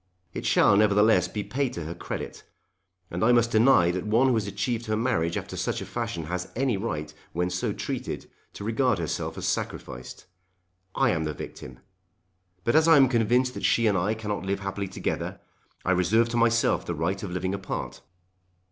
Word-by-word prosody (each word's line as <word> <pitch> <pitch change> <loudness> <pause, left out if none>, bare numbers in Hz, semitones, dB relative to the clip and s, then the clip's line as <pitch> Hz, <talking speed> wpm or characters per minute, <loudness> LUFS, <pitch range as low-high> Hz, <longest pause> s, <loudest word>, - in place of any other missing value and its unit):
It - - -3
shall 100 - +5
nevertheless 105 +1 +4
be 105 - -4
paid 135 -1 -2
to 85 - -5
her 80 +2 -5
credit. 85 - -6 0.7
And 90 +4 -2
I 120 - +5
must 120 -1 +3
deny 110 -6 +5
that 90 0 -3
one 120 +5 +4
who - - +3
has 110 -3 0
achieved 115 +4 -2
her 110 0 0
marriage 85 -9 0
after - - -6
such - - -2
a - - -6
fashion 85 - -4
has 90 +3 -4
any 130 -1 +1
right, 75 -7 -4 0.2
when 90 +1 -1
so 90 - -1
treated, - - -4 0.3
to - - -8
regard 115 +1 +1
herself 80 -2 -3
as - - -4
sacrificed. 65 0 -4 0.7
I - - +3
am 80 -2 -1
the 75 -1 -3
victim. 65 -1 -9 0.8
But 115 - +1
as 160 +1 +5
I 165 -2 +7
am 135 -2 +6
convinced 125 +2 +2
that - - -7
she 115 - +3
and 105 -3 +3
I 95 +4 +1
cannot 105 -2 -4
live 95 0 -2
happily 100 0 -3
together, 95 - -3 0.5
I 95 - +2
reserve 105 +6 +3
to 120 - -4
myself 115 0 +3
the 85 - -4
right 90 +5 -1
of 100 - -5
living 95 +1 -2
apart." 95 -10 -5
100 Hz, 190 wpm, -26 LUFS, 90-115 Hz, 0.8 s, I